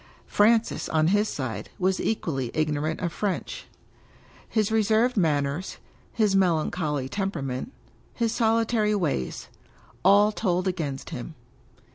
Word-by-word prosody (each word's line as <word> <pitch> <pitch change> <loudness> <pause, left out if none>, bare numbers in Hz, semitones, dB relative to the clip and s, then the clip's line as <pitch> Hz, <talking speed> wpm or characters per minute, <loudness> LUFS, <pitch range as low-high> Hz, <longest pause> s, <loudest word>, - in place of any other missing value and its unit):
Francis, 225 +2 +2
on 155 0 +2
his 205 +2 +2
side, 110 -7 -4
was 190 0 +1
equally 135 - -1
ignorant 155 0 0
of 170 -2 -2
French. 205 -3 -3 0.8
His 215 -2 +1
reserved 220 +3 +3
manners, 150 -2 0 0.3
his 210 -4 +2
melancholy 160 -6 +1
tempera 195 -2 -3
ment, 130 - -4 0.4
his 230 -2 -1
solitary 225 -2 +2
ways 150 - -2 0.3
— - - -28
^all 205 +3 +5
told 185 -3 0
against 155 -7 -3
him. 145 +6 -6
185 Hz, 120 wpm, -26 LUFS, 150-215 Hz, 0.8 s, ^all